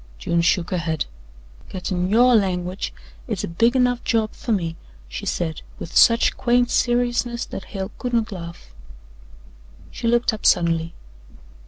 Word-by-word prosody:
June 170 - 0
shook 175 0 +1
her 180 - 0
head. 160 -2 -1 0.6
"Gettin' 180 -1 -2
YOUR 240 +4 +5
language 185 - -1 0.4
is - - -3
a - - -2
big 230 +9 +2
enough 245 -1 +2
job 220 -2 +1
fer - - -5
me," 170 -6 0 0.3
she - - -6
said 160 -3 -2 0.2
with 165 - -8
such 230 0 +5
quaint 245 -1 +2
seriousness 240 0 +1
that 195 - -7
Hale 195 0 -5
could 245 - -3
not 230 -1 +1
laugh. 170 - -9 1.2
She 230 - -4
looked 240 0 +2
up 215 - -7
suddenly. 165 -2 +2
195 Hz, 150 wpm, -22 LUFS, 170-240 Hz, 1.2 s, YOUR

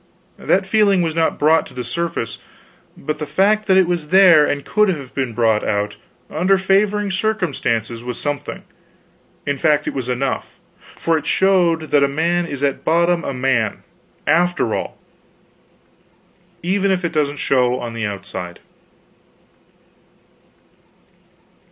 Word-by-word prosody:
That 190 +1 +1
feeling 200 -2 +3
was 165 -1 -1
not 165 0 0
brought 160 +2 +3
to - - -16
the 125 - -4
surface, 120 -3 -3 0.6
but 155 +2 -4
the 150 - -4
fact 205 +8 +1
that 190 - +4
it 190 - +5
was 170 -3 -2
there 175 -4 +6
and 145 -1 -3
could 210 -1 +2
have 140 -8 -4
been 130 -4 -2
brought 110 -2 +2
out, 105 0 -1 0.3
under 185 +5 +2
favoring 200 +1 +1
circumstances, 140 - -1
was 125 -1 -4
something 145 -1 -4 0.8
in 145 -1 -2
fact, 150 0 +2
it - - -2
was 130 -2 -4
enough; 125 +1 -3 0.4
for 165 -1 +1
it - - -10
showed 175 -5 +2
that 145 - +4
a - - +4
man 170 +5 0
is 140 -3 -5
at 140 -1 -1
bottom 170 +1 +2
a - - -3
man, 125 -5 -1 0.4
after 170 -7 +1
all, - - -4 1.7
even 195 +3 +1
if 185 -2 0
it 170 - -3
doesn't 145 -1 0
show 125 -2 +1
on 120 -1 -6
the 115 -1 -4
outside. 90 -3 -7
155 Hz, 145 wpm, -19 LUFS, 130-185 Hz, 1.7 s, there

